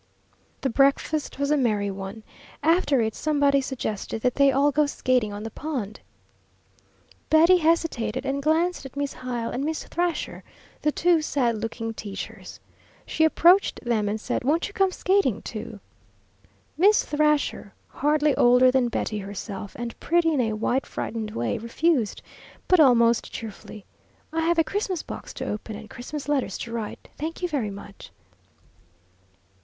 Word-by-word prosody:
The 270 - 0
breakfast 280 +4 +1
was 280 +1 0
a 300 - +4
merry 210 -6 +1
one. 195 +3 -7 0.4
After 310 -5 +3
it 220 -1 0
somebody 285 -1 +2
suggested 225 -5 -4
that 250 - +2
they 280 -1 +4
all 280 +2 +3
go 295 +1 +2
skating 255 -6 0
on 205 +1 -6
the 225 - -6
pond. 245 -9 -5 1.3
Betty 330 +4 +6
hesitated 320 -10 0
and 275 +1 -1
glanced 325 +4 +1
at 270 -1 -10
Miss 285 -1 -2
Hyle 245 -2 -4
and 260 - -3
Miss 315 +1 -2
Thrasher, 345 -1 -2 0.4
the 300 - +2
two 345 +1 +3
sad 255 -6 0
looking 225 0 -4
teachers. 205 -2 -8 0.5
She 320 - 0
approached 350 +5 +4
them 220 -4 +1
and 215 +1 -2
said, 220 - -2
"Won't 305 +6 +1
you 415 - -12
come 385 -2 +2
skating, 370 - +1
too?" 215 -1 -7 1.0
Miss 410 +4 +5
Thrasher, 300 0 0 0.2
hardly 295 0 +1
older 250 +1 +6
than 255 -2 +2
Betty 215 -2 -2
herself, 200 0 -7
and 240 -1 -6
pretty 335 -1 +2
in 275 - +2
a 225 -2 0
white 245 +5 -1
frightened 220 -1 -4
way, 115 - -2
refused, 235 0 0 0.4
but 365 - +5
almost 235 -5 +4
cheerfully. 215 -2 -8 0.5
"I 325 - 0
have 335 +1 +2
a 325 - +5
Christmas 385 -2 -2
box - - -8
to - - -4
open 215 +1 -5
and 215 +1 -9
Christmas 285 +4 -7
letters 290 -3 0
to 230 - -6
write. 225 -3 -5
Thank 325 +4 -5
you - - +2
very 275 -10 -2
much." 200 0 -10
270 Hz, 155 wpm, -25 LUFS, 225-310 Hz, 1.3 s, Betty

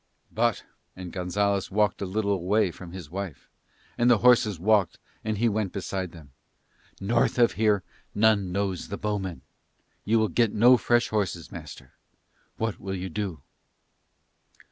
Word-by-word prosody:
"But," 115 -1 0 0.3
and 90 -2 -8
Gonzalez 100 +2 0
walked 105 +1 +1
a 100 - -2
little 100 +2 -1
away 100 +1 +1
from 85 0 -11
his 85 -5 -9
wife, 95 -5 -6 0.5
and 120 +1 +4
the 120 - +6
horses 110 -5 +4
walked 100 -1 +2 0.3
and 110 -1 -2
he 120 +3 +2
went 105 -3 -1
beside 95 -2 -4
them, 75 -5 -14 0.7
"north 115 +6 +1
of 120 -1 +5
here 105 -3 +2 0.3
none 105 -3 +3
knows 95 -1 -2
the 100 - -5
bowmen. 100 -4 -3 0.6
You 110 +2 +2
will 110 -1 +2
get 115 -3 +2
no 120 +4 +7
fresh 120 0 +2
horses, 90 -6 -2
master. - - -10 0.6
What 110 -1 -2
will 95 0 -4
you 95 0 -4
do?" 90 -6 -4
100 Hz, 150 wpm, -26 LUFS, 95-110 Hz, 0.7 s, no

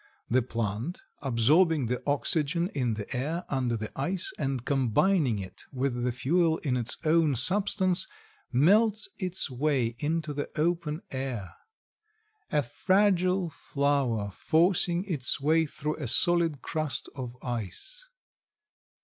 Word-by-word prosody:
The 130 +2 +4
plant, 115 - -4 0.2
absorbing 145 +4 +3
the 125 +2 -2
oxygen 155 +4 +1
in 125 - -1
the 105 +4 -5
air 155 +8 -2
under 125 -4 -1
the 110 0 -6
ice 175 +7 -1
and 135 -4 -2
combining 135 - +2
it 95 -2 -8
with 130 -2 -2
the 125 - +1
fuel 160 +6 +1
in 135 -5 0
its 120 -2 -1
own 155 -3 +3
substance, 185 - +3 0.4
melts 210 - +3
its 185 -6 +2
way 130 -3 0
into 155 +1 -1
the 145 0 -4
open 165 -1 -1
air. 130 -8 -4 1.0
A 150 -3 +2
fragile 185 - +2
flower 140 -9 -1
forcing 175 - +2
its 155 -11 +1
way 160 +3 +2
through 150 +1 -4
a 145 -5 -4
solid 165 +3 +2
crust 155 -3 -2
of 125 -2 -7
ice. 125 - -6
145 Hz, 125 wpm, -28 LUFS, 125-170 Hz, 1.0 s, The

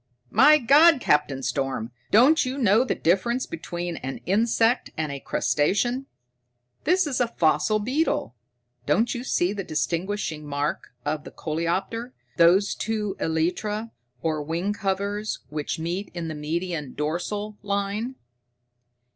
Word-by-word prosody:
"My 285 +8 +7
God, 300 +4 +6
Captain 145 - +1
Storm, 135 -5 -2 0.2
don't 260 +9 +6
you 255 +2 -3
know 230 -2 +4
the 260 - -1
difference 235 +9 +1
between 175 - -5
an 135 +1 -5
insect 225 +4 +2
and 155 -2 -2
a 140 - -5
crustacean? 240 - 0 0.8
This 365 +2 +3
is 265 -4 -1
a 245 - +3
fossil 215 +1 +2
beetle. 250 - -1 0.5
Don't 215 +11 +2
you 240 - -4
see 185 -6 +1
the 200 -2 -4
distinguishing 170 0 -2
mark 145 +1 -2 0.2
of 150 0 -2
the - - -9
coleoptera, 185 +10 -3 0.2
those 180 +4 +5
two 210 -3 -2
elytra, 205 +8 -1 0.3
or 155 -2 0
wing 170 +7 -2
covers, 200 +1 -2
which 150 0 -3
meet 175 +5 -3
in 170 -2 -4
the - - -4
median 155 -1 -3
dorsal 205 +8 -3
line? 200 +5 -2
195 Hz, 130 wpm, -25 LUFS, 160-230 Hz, 0.8 s, My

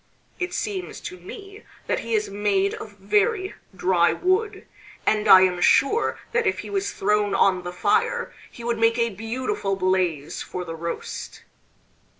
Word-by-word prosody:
It 360 -1 -2
seems 380 0 -4
to 360 +1 -7
me 400 0 -10 0.2
that - - 0
he 230 0 -2
is 210 0 0
made 200 -1 0
of 205 -2 -9
very 400 - +1 0.2
dry 180 -2 +3
wood, 385 +2 0 0.4
and 215 0 +2
I 190 -2 +10
am 180 -1 +1
sure 415 - +3
that 475 -2 +1
if 400 - +1
he - - -9
was 395 0 -1
thrown 205 0 +1
on 190 -2 +3
the 175 0 -6
fire 180 - 0 0.2
he 235 - -12
would 235 -1 -1
make 230 +1 +3
a 235 -1 +2
beautiful 225 - -2
blaze 185 -6 0
for 180 0 -5
the 165 - -6
roast." 170 +1 -6
210 Hz, 160 wpm, -24 LUFS, -, 0.4 s, I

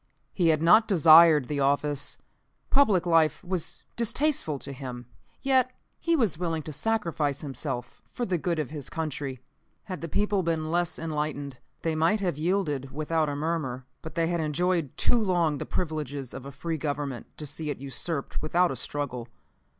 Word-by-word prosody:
He 175 -4 +2
had 155 -1 +3
not 215 +7 +6
desired 160 - +7
the 145 -1 -2
office; 145 +1 +1 0.5
public 215 -11 +4
life 165 -3 +3
was 180 -2 -4
distasteful 235 - +1
to 140 +1 -6
him, 125 -2 -7 0.4
yet 260 -2 +4 0.3
he 335 0 +2
was 220 - +1
willing 165 -3 -1
to 155 - -7
sacrifice 165 -6 0
himself 130 -3 -5
for 245 - -3
the 180 -4 0
good 170 +1 -1
of 150 -3 -2
his 150 -4 -6
country. 140 -5 -4 0.4
"Had 185 -3 -6
the 165 - -3
people 205 +3 +1
been 160 -2 -1
less 175 0 +1
enlightened, 150 -4 -3 0.2
they 165 - +1
might 165 +7 +2
have 180 -6 0
yielded 155 -6 0
without 155 +2 0
a 145 - -2
murmur; 145 -5 -2 0.2
but 160 0 -9
they 165 -1 +2
had 170 +1 0
enjoyed 160 -1 0
too 240 - +3
long 175 -8 +1
the - - -5
privileges 145 -6 -3
of 135 0 -7
a - - -7
free 160 +4 -4
Government 145 -3 -3
to 150 - -5
see 150 +2 -3
it 145 - -2
usurped 140 +3 -4
without 175 +3 +2
a - - -3
struggle. 125 -1 -4
155 Hz, 175 wpm, -27 LUFS, 140-175 Hz, 0.5 s, desired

